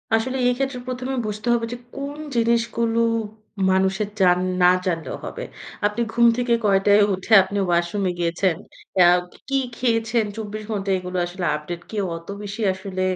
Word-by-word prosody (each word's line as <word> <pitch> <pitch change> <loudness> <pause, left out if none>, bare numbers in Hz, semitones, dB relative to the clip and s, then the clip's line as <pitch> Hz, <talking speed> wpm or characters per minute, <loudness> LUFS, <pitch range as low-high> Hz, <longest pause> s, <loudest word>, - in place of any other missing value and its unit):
আসলে 255 +4 -1
এই 245 - +3
ক্ষেত্রে 270 -2 -2
প্রথমে 255 +1 -3
বুঝতে 215 +2 -5
হবে 235 -1 +1
যে, - - -5 0.2
কোন 280 +1 -5 0.2
জিনিসগুলো 230 0 +1 0.7
মানুষের 190 +2 +1
যান 180 -2 +5 0.2
না 180 0 +7
জানলেও 165 -6 -2
হবে। - - -6 0.4
আপনি 210 +3 -3
ঘুম 235 0 +4
থেকে 245 -1 +1
কয়টায় 205 +1 +4
উঠে 190 +4 -2
আপনি 200 +2 -5
ওয়াশরুমে 175 +2 +1
গিয়েছেন। 170 +1 +1 0.5
আ - - +7 0.4
কি 275 - +2 0.2
খেয়েছেন 230 -2 +1
২৪ 215 -1 -6
ঘণ্টায় 195 -2 0
এগুলো 180 0 -5
আসলে 175 +1 -5
আপডেট 170 +3 -6
কেউ 205 -3 -1
অত 165 - -14 0.2
বেশি 205 +3 -6
আসলে 190 0 -5
205 Hz, 155 wpm, -22 LUFS, 185-235 Hz, 0.7 s, না